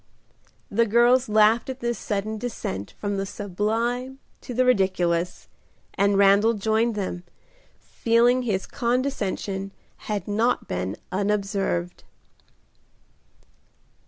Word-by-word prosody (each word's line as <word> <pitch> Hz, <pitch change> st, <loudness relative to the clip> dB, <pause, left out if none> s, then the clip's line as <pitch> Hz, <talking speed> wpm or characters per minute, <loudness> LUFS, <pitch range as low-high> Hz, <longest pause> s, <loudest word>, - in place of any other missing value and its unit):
The 230 Hz, +3 st, +2 dB
girls 240 Hz, +3 st, +4 dB
laughed 215 Hz, +3 st, +4 dB
at 260 Hz, 0 st, -5 dB
this 240 Hz, -1 st, -2 dB
sudden 215 Hz, +1 st, -3 dB
descent 155 Hz, -, -5 dB
from 205 Hz, -1 st, -3 dB
the 195 Hz, -, -1 dB
sublime 225 Hz, +7 st, -2 dB, 0.2 s
to -, -, -8 dB
the 255 Hz, +1 st, +2 dB
ridiculous, 180 Hz, -6 st, +1 dB, 0.5 s
and 200 Hz, 0 st, +2 dB
Randal 200 Hz, +3 st, +5 dB
joined 220 Hz, +2 st, +1 dB
them, 185 Hz, -3 st, -4 dB, 0.6 s
feeling 240 Hz, +2 st, +2 dB
his 205 Hz, -6 st, -1 dB
condescension 225 Hz, -6 st, -2 dB, 0.3 s
had 210 Hz, -2 st, -4 dB
not 220 Hz, +4 st, 0 dB
been 90 Hz, +2 st, -3 dB
unobserved. 195 Hz, -, -1 dB
210 Hz, 100 wpm, -24 LUFS, 195-235 Hz, 0.6 s, Randal